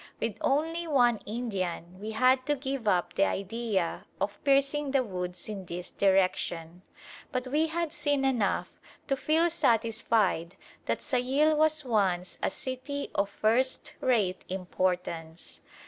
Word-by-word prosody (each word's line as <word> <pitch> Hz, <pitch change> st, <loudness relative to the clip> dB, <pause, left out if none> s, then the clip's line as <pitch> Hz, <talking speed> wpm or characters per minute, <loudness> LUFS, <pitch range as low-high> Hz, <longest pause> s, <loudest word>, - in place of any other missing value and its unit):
With 225 Hz, -2 st, -2 dB
only 325 Hz, +5 st, 0 dB
one 245 Hz, -7 st, +4 dB
Indian 185 Hz, -6 st, -3 dB
we 215 Hz, +2 st, -5 dB
had 255 Hz, +4 st, +3 dB
to 295 Hz, -, +2 dB
give 270 Hz, -4 st, -4 dB
up 180 Hz, -3 st, +2 dB
the 195 Hz, -, +3 dB
idea 200 Hz, -3 st, -2 dB
of 205 Hz, -, -3 dB
piercing 280 Hz, +1 st, +2 dB
the 270 Hz, -1 st, +2 dB
woods 180 Hz, -4 st, -5 dB
in 205 Hz, -3 st, -5 dB
this 175 Hz, 0 st, -6 dB
direction; 185 Hz, -3 st, +1 dB, 0.5 s
but 255 Hz, -2 st, -1 dB
we 300 Hz, +5 st, +1 dB
had 330 Hz, -1 st, -2 dB
seen 290 Hz, -2 st, 0 dB
enough 240 Hz, -7 st, +1 dB, 0.3 s
to 275 Hz, -, +1 dB
feel 315 Hz, +5 st, +2 dB
satisfied 225 Hz, -, +1 dB, 0.3 s
that -, -, 0 dB
Sayil 270 Hz, +5 st, +2 dB
was 310 Hz, -1 st, +3 dB
once 190 Hz, -6 st, 0 dB
a -, -, +1 dB
city 270 Hz, +2 st, -5 dB
of 200 Hz, 0 st, +1 dB
first 235 Hz, +6 st, +1 dB
rate 210 Hz, -8 st, +1 dB
importance. 180 Hz, -3 st, -3 dB
230 Hz, 135 wpm, -29 LUFS, 185-275 Hz, 0.5 s, one